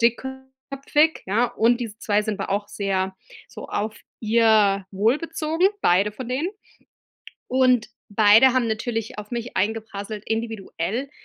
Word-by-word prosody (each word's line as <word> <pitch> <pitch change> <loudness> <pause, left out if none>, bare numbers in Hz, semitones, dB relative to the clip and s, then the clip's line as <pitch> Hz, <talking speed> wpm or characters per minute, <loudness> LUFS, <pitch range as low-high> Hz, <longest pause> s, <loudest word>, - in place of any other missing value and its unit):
dickköpfig, 265 +5 0
ja, 225 +6 +2
und 235 +1 +2
diese 220 -2 -6
2 210 -1 +1
sind 210 -1 -3
aber - - -4
auch 205 0 -2
sehr 190 -1 -2 0.3
so - - -9
auf 215 0 -3 0.2
ihr 215 -3 +3
Wohl 220 +9 +2
bezogen, 325 +1 0 0.2
beide 195 +4 +3
von 250 +2 -7
denen. 285 +9 -1 1.0
Und 255 -3 +3 0.2
beide 215 +5 +6
haben 245 -3 +2
natürlich 225 0 -3
auf 210 +2 -8
mich 235 -2 -5
eingeprasselt 210 0 -3
individuell, 225 +1 -3
225 Hz, 135 wpm, -23 LUFS, 205-255 Hz, 1.0 s, beide